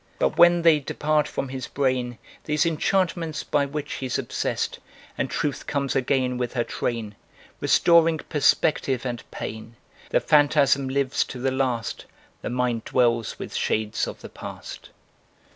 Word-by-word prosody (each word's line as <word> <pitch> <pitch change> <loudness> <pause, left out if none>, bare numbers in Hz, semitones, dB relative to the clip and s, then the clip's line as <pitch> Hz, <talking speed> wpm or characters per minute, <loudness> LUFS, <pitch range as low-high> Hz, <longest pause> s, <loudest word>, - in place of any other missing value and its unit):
But, - - +1
when 175 0 +6
they 165 -3 +6
depart 150 +2 0
from 135 - -4
his 130 -1 -5
brain, 130 -3 -1 0.3
These 150 0 +1
enchantments 165 -1 0
by 145 -1 +1
which 145 +1 -5
he's 130 -1 -1
obsessed, 135 - -2 0.4
And - - -2
Truth 145 -1 -2
comes 140 -2 -1
again 130 -1 +1
with 125 -1 -2
her 120 -2 +1
train 115 -3 -3 0.5
Restoring 165 -1 +4
perspective 140 -4 +1
and 120 -2 -3
pain, 110 +1 -7 0.3
The - - +3
phantasm 145 -2 +3
lives 135 0 +1
to - - -8
the 135 +1 0
last, 125 -4 -2 0.4
The - - -4
mind 120 -2 -1
dwells 120 -3 +1
with - - -7
shades 110 0 0
of - - -8
the - - -9
past. - - -9
135 Hz, 145 wpm, -24 LUFS, 125-150 Hz, 0.5 s, when